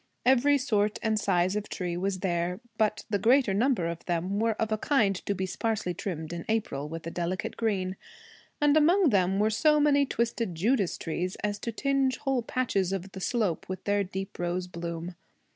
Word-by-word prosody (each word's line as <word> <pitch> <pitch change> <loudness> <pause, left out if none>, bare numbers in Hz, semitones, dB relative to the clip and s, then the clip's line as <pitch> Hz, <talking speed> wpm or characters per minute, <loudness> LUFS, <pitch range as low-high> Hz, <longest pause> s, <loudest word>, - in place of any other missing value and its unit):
Every 265 +3 +5
sort 210 -5 +1
and 220 -1 +1
size 185 -1 +1
of 210 0 -3
tree 180 -3 -3
was 185 +1 -2
there, 175 0 -1 0.2
but 215 -1 +1
the 205 - +2
greater 245 -1 +4
number 225 -3 +2
of 170 0 -4
them 180 +3 -1
were 225 0 +2
of 220 0 -2
a 215 - +2
kind 215 -9 +2
to 200 - +1
be 190 0 -2
sparsely 195 -1 -2
trimmed 165 -3 -5
in 170 -1 -5
April 150 -10 -1
with 165 0 -7
a 165 - -4
delicate 175 +2 -3
green, 190 -5 -1 0.6
and 295 0 +4
among 335 +3 +5
them 190 -3 +2
were 215 +2 +2
so 300 +7 +4
many 285 -1 +4
twisted 230 -6 -1
Judas 200 +2 +1
trees 180 +3 -3
as 205 0 -1
to 230 - -3
tinge 270 +1 +1
whole 270 -2 0
patches 225 -6 0
of 195 0 -4
the 190 - -8
slope 210 -8 -1
with 185 - -5
their 205 0 +1
deep 190 +1 -6
rose 175 +1 -1
bloom. 170 0 -5
200 Hz, 195 wpm, -28 LUFS, 180-235 Hz, 0.6 s, Every